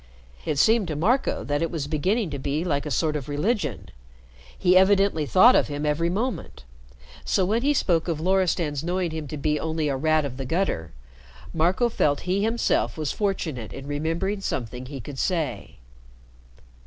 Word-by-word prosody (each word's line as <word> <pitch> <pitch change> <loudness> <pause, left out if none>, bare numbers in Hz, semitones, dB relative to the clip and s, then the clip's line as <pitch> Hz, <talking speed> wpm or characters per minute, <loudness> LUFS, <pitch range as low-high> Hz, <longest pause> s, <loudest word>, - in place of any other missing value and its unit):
It 145 - -1
seemed 220 +4 +4
to 155 - -3
Marco 230 - +1
that 145 +1 -1
it 165 - 0
was 160 -5 -3
beginning 180 +6 0
to 140 - -4
be 145 +4 -1
like 150 -4 -1
a - - -2
sort 155 +1 0
of 145 -2 -4
religion. 150 - -1 0.7
He 180 -1 +3
evidently 190 -5 +4
thought 225 - +6
of - - +3
him 145 0 -4
every 150 +3 +1
moment. 225 - -3 0.6
So 190 - +1
when 220 +5 +1
he 290 +3 +2
spoke 170 -9 +1
of 165 -3 -1
Loristan's 170 -5 +1
knowing 175 0 -1
him 160 -2 -5
to 155 - -6
be 150 +1 0
only 160 -2 -1
a 140 - 0
rat 155 +2 +2
of 130 -2 -6
the 135 - -4
gutter, 130 - -1 0.6
Marco 175 +9 +2
felt 145 -11 +1
he 185 +2 0
himself 225 -3 0
was 155 -2 -2
fortunate 160 - -2
in 135 - -8
remembering 165 +8 -2
something 125 - -4
he 140 0 -7
could 135 +3 -8
say. 170 -5 -2
160 Hz, 180 wpm, -25 LUFS, 145-190 Hz, 0.7 s, thought